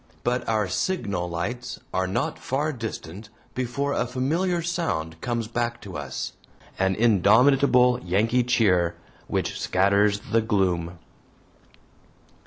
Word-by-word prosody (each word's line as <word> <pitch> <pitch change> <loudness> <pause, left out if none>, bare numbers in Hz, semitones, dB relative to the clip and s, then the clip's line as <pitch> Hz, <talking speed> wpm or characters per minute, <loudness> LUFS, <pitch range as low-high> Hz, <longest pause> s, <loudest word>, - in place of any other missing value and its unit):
But 125 0 -1
our 110 -3 +1
signal 95 - -1
lights 100 +9 -4
are 95 0 0
not 95 - -2
far 150 +4 -1
distant 110 - -7 0.2
before 130 +3 -2
a 125 - 0
familiar 170 +8 0
sound 85 - -2
comes 120 -2 -2
back 120 0 -2
to 95 -3 -9
us 70 -3 -5 0.5
an 95 0 +2
indomitable 125 +4 +4
Yankee 110 +7 +2
cheer 95 -9 +2 0.3
which - - -2
scatters 100 +2 +3
the 115 - +4
gloom. 90 -5 0
110 Hz, 115 wpm, -25 LUFS, 95-125 Hz, 0.5 s, indomitable